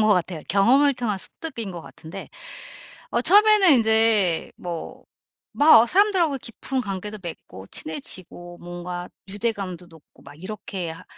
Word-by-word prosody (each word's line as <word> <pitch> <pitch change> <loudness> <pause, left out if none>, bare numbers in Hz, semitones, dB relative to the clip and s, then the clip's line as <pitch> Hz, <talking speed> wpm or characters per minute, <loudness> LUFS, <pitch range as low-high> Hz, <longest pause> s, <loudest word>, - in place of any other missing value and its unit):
것 215 - +3
같아요. 175 -2 -2
경험을 255 +10 +4
통한 220 -6 -2
습득인 230 - -7
거 170 -2 -8
같은데. 165 +5 -11 0.8
어 - - +1
처음에는 410 -3 +6
인제 220 -7 +3
뭐 170 -2 -7 0.5
막 290 -6 +7
아 - - 0
사람들하고 365 - +2
깊은 260 +3 -4
관계도 205 0 -5
맺고 95 - -9
친해지고 175 +3 -7
뭔가 175 0 -7 0.2
유대감도 195 -4 -4
높고 160 -2 -20
막 140 +1 -13
이렇게 190 -3 -6
하 160 - -10
200 Hz, 295 characters per minute, -23 LUFS, 175-245 Hz, 0.8 s, 막